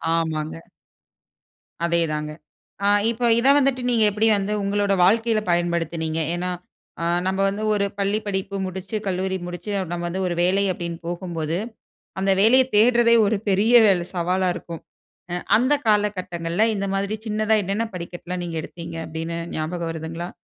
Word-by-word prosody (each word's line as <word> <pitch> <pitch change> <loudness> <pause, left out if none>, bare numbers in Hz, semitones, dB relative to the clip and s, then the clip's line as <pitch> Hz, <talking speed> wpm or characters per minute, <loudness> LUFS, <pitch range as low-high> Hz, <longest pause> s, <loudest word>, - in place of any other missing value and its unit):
ஆமாங்க. 160 -1 -2 1.2
அதேதாங்க. 155 -3 0 0.5
ஆ - - +4 0.2
இப்ப 235 +1 -5 0.2
இத 260 - +1
வந்துட்டு 270 -2 +2
நீங்க 225 -2 +3
எப்படி 215 +2 +1
வந்து 200 +2 -2
உங்களோட 200 0 +1
வாழ்க்கையில 225 +2 +2
பயன்படுத்தினீங்க? 170 -2 -1 0.2
ஏனா 180 +1 -2 0.5
ஆ - - -1 0.2
நம்ப 190 +1 -1
வந்து 205 +2 -4
ஒரு 200 -1 +1
பள்ளி 200 +2 +1
படிப்பு 195 0 -3
முடிச்சு, 190 +3 -6
கல்லூரி 190 0 -1
முடிச்சு 175 +4 -7 0.2
நம்ம 175 0 -3
வந்து 190 +2 -3
ஒரு 175 - -2
வேலை 195 +3 +2
அப்படின்னு 170 -1 -5
போகும்போது. 170 -2 -3 0.6
அந்த 195 0 +2
வேலைய 255 +5 +6
தேடுறதே 235 +1 +5
ஒரு 200 +1 +1
பெரிய 210 +5 +3
வேல 180 -3 +2
சவாலா 180 +2 0
இருக்கும். 165 -1 -8 0.5
அ - - -1 0.2
அந்த 255 +5 +2
காலகட்டங்கள்ல 185 -3 0
இந்த 200 0 -2
மாதிரி 200 +2 -1
சின்னதா 215 +1 +1
என்னென்ன 205 +5 -1
படிக்கட்டுலாம் 175 +1 -6
நீங்க 165 -1 -4
எடுத்தீங்க 165 -1 -8
அப்படின்னு 165 +1 -5 0.2
ஞாபகம் 165 +2 -3
வருதுங்களா? 165 +2 -6
185 Hz, 145 wpm, -23 LUFS, 170-210 Hz, 1.2 s, வேலைய